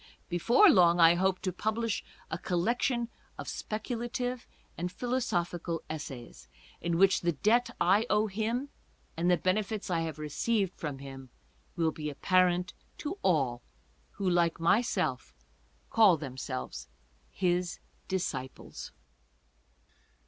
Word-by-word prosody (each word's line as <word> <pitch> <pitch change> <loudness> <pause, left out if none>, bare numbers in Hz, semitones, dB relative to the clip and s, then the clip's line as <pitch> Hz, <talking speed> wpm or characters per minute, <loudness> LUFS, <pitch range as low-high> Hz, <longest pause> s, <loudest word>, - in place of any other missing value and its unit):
Before 235 - +5
long 175 - +6
I 165 0 +8
hope 185 +1 +1
to 185 - -2
publish 220 +3 -1 0.3
a - - -2
collection 235 +6 0 0.3
of - - -7
speculative 240 +3 -3 0.3
and 180 +1 -3
philosophical 175 -9 -2
essays, 130 - -8 0.3
in 170 -1 0
which 195 +1 +4
the 170 0 +1
debt 230 - +2
I 205 +6 +4
owe 210 +1 +3
him 225 +6 -2 0.5
and 170 +2 +1
the 180 - +5
bene 185 +5 +2
fits 210 -1 -5
I 170 - +2
have 160 -2 -3
received 190 +6 0
from 145 -4 -5
him 135 -1 -9 0.5
will 165 -2 +1
be 150 -1 -5
apparent 180 +4 +2 0.2
to 350 +7 -5
all 135 -9 +1 0.5
who, 200 -1 -3
like 175 -2 +2
myself, 170 - +1 0.6
call 210 -7 +6
themselves 130 - -5 0.4
his 180 -1 0 0.3
disciples. 135 -9 -4
180 Hz, 120 wpm, -30 LUFS, 165-215 Hz, 0.6 s, I